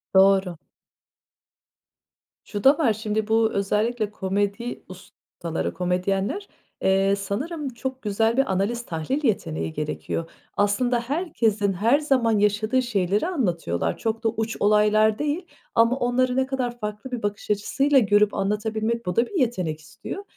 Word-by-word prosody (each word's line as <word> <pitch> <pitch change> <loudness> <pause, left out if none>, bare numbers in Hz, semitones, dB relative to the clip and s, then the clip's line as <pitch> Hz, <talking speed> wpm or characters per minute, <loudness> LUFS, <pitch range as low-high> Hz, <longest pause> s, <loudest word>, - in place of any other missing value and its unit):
Doğru. 190 -2 +4 1.9
Şu 205 -2 -5
da 275 +2 +6
var, 250 -9 +3
şimdi 215 0 -2
bu 220 0 +3
özellikle 210 +2 0
komedi 205 +4 -2
ustaları, 175 -2 -6
komedyenler, 190 - -1 0.3
eee, 195 +1 +3
sanırım 270 - -3
çok 260 +2 -5
güzel 225 +3 +1
bir 270 - +2
analiz, 215 +6 -1
tahlil 170 - -3
yeteneği 165 - -1
gerekiyor. 155 +2 -4 0.3
Aslında 235 +4 +2
herkesin 235 - 0
her 230 - +3
zaman 250 -7 +2
yaşadığı 215 +5 +2
şeyleri 205 - 0
anlatıyorlar, 170 - -1
çok 225 0 -2
da 225 - +3
uç 225 0 -3
olaylar 210 +1 +4
değil 300 +5 -1 0.3
ama 230 +2 +4
onları 250 +1 +1
ne 265 0 +2
kadar 250 -3 -3
farklı 210 +4 -5
bir 245 -3 -4
bakış 205 0 -2
açısıyla 270 +7 +3
görüp 205 -1 +3
anlatabilmek, 220 +3 -1
bu 180 - -2
da 235 - +3
bir 380 - -3
yetenek 185 - 0
istiyor. 390 - -8
215 Hz, 135 wpm, -24 LUFS, 195-245 Hz, 1.9 s, da